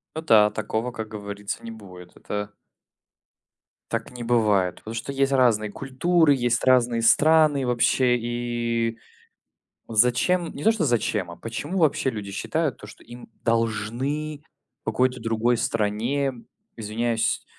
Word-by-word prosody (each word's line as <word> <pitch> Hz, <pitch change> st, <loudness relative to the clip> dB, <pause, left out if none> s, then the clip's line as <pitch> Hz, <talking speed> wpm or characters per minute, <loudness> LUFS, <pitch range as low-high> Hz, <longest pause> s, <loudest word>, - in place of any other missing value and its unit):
Ну 160 Hz, -, -2 dB
да, 110 Hz, -9 st, +5 dB
такого, 110 Hz, +3 st, -3 dB
как 110 Hz, -2 st, -6 dB
говорится, 100 Hz, -1 st, -6 dB
не 115 Hz, -, -6 dB
будет. 90 Hz, -5 st, -12 dB
Это 105 Hz, 0 st, -5 dB, 1.4 s
Так -, -, -3 dB
не 125 Hz, -1 st, -8 dB
бывает, 105 Hz, -7 st, +2 dB
потому 110 Hz, -, -9 dB
что 115 Hz, +4 st, -4 dB
есть 135 Hz, 0 st, +1 dB
разные 115 Hz, -5 st, +3 dB
культуры, 145 Hz, +6 st, +2 dB
есть 120 Hz, -2 st, 0 dB
разные 125 Hz, -2 st, +3 dB
страны 150 Hz, +2 st, +4 dB
вообще. 125 Hz, +1 st, +2 dB
И 120 Hz, -1 st, -2 dB, 0.9 s
зачем 125 Hz, +10 st, +2 dB
не 145 Hz, -, -7 dB
то 225 Hz, -, +5 dB
что 220 Hz, -6 st, -1 dB
зачем, 110 Hz, -6 st, 0 dB
а 85 Hz, -, -11 dB
почему 145 Hz, +10 st, -5 dB
вообще 155 Hz, -5 st, +2 dB
люди 105 Hz, -5 st, -6 dB
считают 155 Hz, +5 st, -2 dB
то, 105 Hz, -, -12 dB
что 105 Hz, -, -14 dB
им 120 Hz, 0 st, -12 dB
должны 120 Hz, +7 st, -1 dB, 0.4 s
в -, -, -56 dB
какой-то 125 Hz, +2 st, 0 dB
другой 115 Hz, +1 st, +1 dB
стране, 115 Hz, +7 st, -1 dB, 0.4 s
извиняюсь, 115 Hz, +1 st, -1 dB
120 Hz, 135 wpm, -24 LUFS, 110-135 Hz, 1.4 s, да